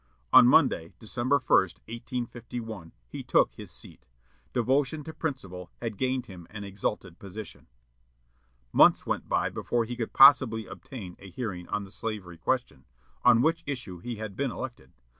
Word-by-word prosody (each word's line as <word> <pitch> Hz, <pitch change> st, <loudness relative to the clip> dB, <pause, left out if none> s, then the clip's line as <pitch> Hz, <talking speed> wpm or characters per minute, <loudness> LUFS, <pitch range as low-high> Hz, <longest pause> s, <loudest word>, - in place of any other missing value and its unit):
On 125 Hz, -, +10 dB
Monday, 125 Hz, -, +4 dB
December 120 Hz, +4 st, 0 dB
1, 130 Hz, -, -10 dB
1851, 115 Hz, -1 st, -6 dB, 0.2 s
he -, -, -7 dB
took -, -, +3 dB
his -, -, -8 dB
seat. -, -, -8 dB, 0.4 s
Devotion 135 Hz, +5 st, +1 dB
to 160 Hz, -, -8 dB
principle 95 Hz, -, -5 dB
had 115 Hz, -3 st, -4 dB
gained 130 Hz, +2 st, -1 dB
him 90 Hz, -4 st, -11 dB
an 105 Hz, -1 st, -7 dB
exalted 100 Hz, -2 st, -4 dB
position. 100 Hz, +2 st, -8 dB, 1.1 s
Months -, -, +6 dB
went -, -, -2 dB
by -, -, +1 dB
before 120 Hz, -1 st, -1 dB
he 120 Hz, +2 st, -5 dB
could 115 Hz, -2 st, -4 dB
possibly 130 Hz, -5 st, +7 dB
obtain 95 Hz, 0 st, -9 dB
a 100 Hz, -, -11 dB
hearing 95 Hz, -4 st, -5 dB
on 105 Hz, -, -2 dB
the 95 Hz, -, -12 dB
slavery 100 Hz, -5 st, -6 dB
question, 85 Hz, -, -2 dB, 0.4 s
on 120 Hz, -1 st, +6 dB
which 165 Hz, +1 st, +2 dB
issue 120 Hz, -11 st, -5 dB
he 120 Hz, +6 st, -5 dB
had 105 Hz, -2 st, -6 dB
been 140 Hz, +3 st, -1 dB
elected. 120 Hz, -, -7 dB
115 Hz, 155 wpm, -28 LUFS, 95-130 Hz, 1.1 s, On